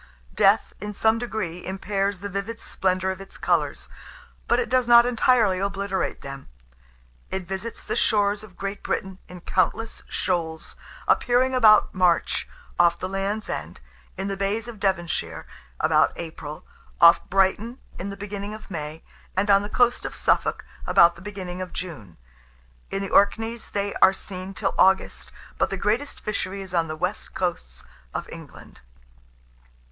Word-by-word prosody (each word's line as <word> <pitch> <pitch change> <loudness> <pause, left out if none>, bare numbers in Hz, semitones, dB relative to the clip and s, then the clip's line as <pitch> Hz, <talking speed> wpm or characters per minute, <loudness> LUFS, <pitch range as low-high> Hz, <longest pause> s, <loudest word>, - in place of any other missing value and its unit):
Death, - - +3
in 210 +1 -4
some 220 +2 +3
degree, 210 -8 -4
impairs 195 0 -2
the 200 - -3
vivid 200 +4 -4
splendour 185 0 0
of 190 +1 -7
its 195 - -12
colours; - - 0 0.6
but - - +3
it 470 - 0
does 255 -2 +2
not 235 0 +8
entirely 235 -5 +3
obliterate 195 0 -2
them. 140 0 -9 0.8
It 190 -2 -4
visits 195 +4 -5
the - - -3
shores 205 -1 +2
of 210 -4 -14
Great 195 +1 -4
Britain 190 0 -3
in 180 -1 -11
countless 220 +6 0
shoals, 165 -3 -2 0.3
appearing 255 +1 +3
about 220 -4 +6
March, 180 -3 +2 0.3
off 170 -1 +5
the 185 - -4
Land's 195 +3 -2
End; - - -5 0.4
in 195 - -3
the 195 - -2
bays 200 +4 -1
of 230 -3 -9
Devonshire, 190 -4 -1 0.3
about - - +3
April; 155 -2 -7 0.3
off 170 0 +7
Brighton 195 +5 +1 0.2
in 190 - -4
the 200 - -7
beginning 205 +1 -5
of 215 -1 -13
May; 155 -1 -5 0.3
and 200 +2 +3
on 200 0 +6
the 205 - -5
coast 245 +2 +2
of - - -5
Suffolk - - +1 0.2
about 170 0 +6
the 170 - -14
beginning 185 -2 -6
of 185 -2 -6
June. 130 - -7 0.7
In 195 0 -2
the 195 - -5
Orkneys 225 +3 +2
they 200 0 -2
are 190 - +7
seen 190 0 -7
till - - -1
August; 190 +1 +3 0.3
but - - +2
the 195 - -3
greatest 225 +9 -1
fishery 200 -2 -3
is 190 -2 -9
on 165 -2 +2
the 155 0 -5
west - - -3
coasts - - -3 0.3
of - - -3
England. - - -12
195 Hz, 160 wpm, -24 LUFS, 180-210 Hz, 0.8 s, not